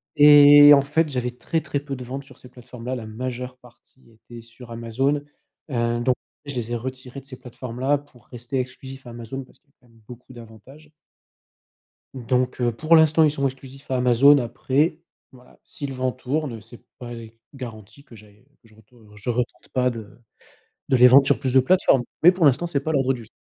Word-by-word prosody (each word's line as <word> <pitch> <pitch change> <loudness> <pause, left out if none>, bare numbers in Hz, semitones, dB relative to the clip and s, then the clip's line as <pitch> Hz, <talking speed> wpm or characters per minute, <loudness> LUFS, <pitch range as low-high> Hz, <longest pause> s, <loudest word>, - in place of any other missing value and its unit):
et 145 0 +8
en 140 - +3
fait, 155 +3 0
j'avais 125 -2 -3
très, 160 +6 -3
très 145 -1 -3
peu 140 -1 -7
de 125 - -8
ventes 135 +3 -7
sur - - -18
ces 125 - -16
plateformes 125 -1 -13
là, 130 +1 -3
la 115 - -7
majeure 125 +2 -6
partie 125 0 -23
était 115 +1 -14
sur 115 +1 -15
Amazon. 130 +5 -2 0.5
Heu, 120 -1 -1
donc, 125 +1 +1 0.3
je 140 - -6
les 120 -1 -4
ai - - -1
retirés 130 +2 -7
de 135 - -18
ces 130 -2 -11
plateformes 125 -1 -9
là 140 +3 +1
pour 135 -6 -20
rester 125 +2 -5
exclusif 130 0 -8
Amazon 120 +3 -8
parce 125 - -23
qu'il 140 - -43
y - - -51
a - - -73
quand 125 - -26
même 115 -1 -24
beaucoup 125 +1 -13
d'avantages 120 +6 -15 1.2
donc, 125 0 -2
heu, 120 -1 0
pour 160 +6 +3
l'instant, 160 0 +4
ils 150 - +3
sont 140 -2 -3
exclusifs 135 +1 -7
à 130 - -1
Amazon 125 +4 +5
après, 135 +6 -1 0.3
voilà, 125 -2 -20
si 145 - -8
le 135 - -7
vent 130 0 -2
tourne, 135 +1 -4
heu, 110 - -11
c'est 115 +2 -16 0.2
pas 120 -1 -9 0.4
garanti 115 -1 -11
que 120 - -17
j'aille, 105 0 -19
heu, 125 - -29 0.2
que 115 - -23
je 110 - -23
retour 110 +3 -23
heu, 105 -1 -19
je 105 +3 -7
retente 120 +1 -4
pas 125 -1 +1
de 115 -1 -10 0.7
de 130 - +3
les 125 - +7
vendre 135 +2 +6
sur - - +3
plus 130 -2 -3
de 130 - +6
plateformes. 135 -3 +2 0.2
Mais 175 +3 +7
pour 175 -4 +1
l'instant, 140 +6 +2
c'est 145 -5 -2
pas 155 - -4
à - - 0
l'ordre 135 -1 +1
du 120 -3 -8
jour. - - -19
130 Hz, 225 wpm, -22 LUFS, 120-140 Hz, 1.2 s, et